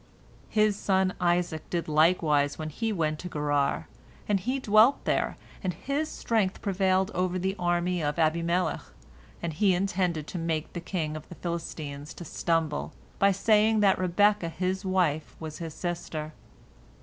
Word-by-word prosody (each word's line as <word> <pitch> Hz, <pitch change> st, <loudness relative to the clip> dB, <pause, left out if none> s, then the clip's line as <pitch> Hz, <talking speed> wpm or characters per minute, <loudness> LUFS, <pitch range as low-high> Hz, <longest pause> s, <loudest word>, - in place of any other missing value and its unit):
"His 215 Hz, -1 st, +3 dB
son 190 Hz, -2 st, +1 dB
Isaac 175 Hz, -2 st, 0 dB
did 170 Hz, -1 st, -2 dB
likewise 155 Hz, -2 st, +3 dB
when 155 Hz, -1 st, -4 dB
he 225 Hz, +8 st, -2 dB
went 155 Hz, -5 st, -1 dB
to 180 Hz, -, -6 dB
Gerar, 145 Hz, -2 st, 0 dB, 0.4 s
and 205 Hz, -2 st, +2 dB
he 250 Hz, +8 st, -1 dB
dwelt 220 Hz, +3 st, +4 dB
there, -, -, 0 dB, 0.3 s
and 185 Hz, -2 st, -1 dB
his 290 Hz, +3 st, -2 dB
strength 210 Hz, -5 st, 0 dB
prevailed 190 Hz, 0 st, +1 dB
over 185 Hz, 0 st, 0 dB
the 190 Hz, +2 st, -1 dB
army 175 Hz, 0 st, +1 dB
of 145 Hz, -1 st, -1 dB
Abimelech, 170 Hz, +2 st, +1 dB, 0.6 s
and 170 Hz, -2 st, -2 dB
he 190 Hz, +3 st, +3 dB
intended 180 Hz, -4 st, 0 dB
to 175 Hz, -, -5 dB
make 165 Hz, -1 st, -2 dB
the 175 Hz, -, -4 dB
kingdom 160 Hz, -4 st, -3 dB
of -, -, -25 dB
the 175 Hz, -, -9 dB
Philistines 155 Hz, -4 st, -5 dB
to 175 Hz, -, -8 dB
stumble, 160 Hz, -1 st, -1 dB, 0.3 s
by 200 Hz, 0 st, +5 dB
saying 215 Hz, +2 st, +3 dB
that 195 Hz, -2 st, +4 dB
Rebekah 185 Hz, 0 st, +3 dB
his 185 Hz, +3 st, -2 dB
wife 180 Hz, -5 st, 0 dB
was 155 Hz, -1 st, -7 dB
his 165 Hz, -2 st, -6 dB
sister. 160 Hz, -3 st, -4 dB
175 Hz, 155 wpm, -28 LUFS, 160-195 Hz, 0.6 s, by